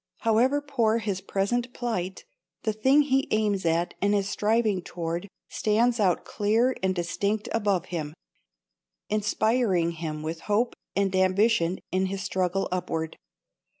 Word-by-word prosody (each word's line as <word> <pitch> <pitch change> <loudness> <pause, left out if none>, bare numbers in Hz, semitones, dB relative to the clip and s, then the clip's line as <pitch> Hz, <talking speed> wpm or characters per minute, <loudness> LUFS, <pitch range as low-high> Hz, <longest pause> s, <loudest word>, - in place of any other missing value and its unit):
However 250 +6 +3
poor 235 -6 +1
his 205 -4 -2
present 235 +6 -1
plight, 190 -7 -3 0.4
the 220 - 0
thing 265 +7 +4
he 270 -1 +1
aims 205 -4 +1
at 170 +2 +1
and 205 +1 +3
is 200 -1 0
striving 210 -1 +1
toward 170 +2 -4 0.2
stands 230 +3 +1
out 185 -4 +2
clear 225 +5 +1
and 190 0 +1
distinct 200 +5 -1
above 200 -5 +1
him, 155 -2 -3 1.0
inspiring 210 -4 +1
him 155 -2 -5
with 160 +1 -4
hope 225 +4 +2 0.2
and 195 -1 +1
ambition 185 -1 +3
in 190 +1 +1
his 190 0 -4
struggle 185 +1 0
upward. 160 -3 -2
200 Hz, 135 wpm, -26 LUFS, 180-225 Hz, 1.0 s, thing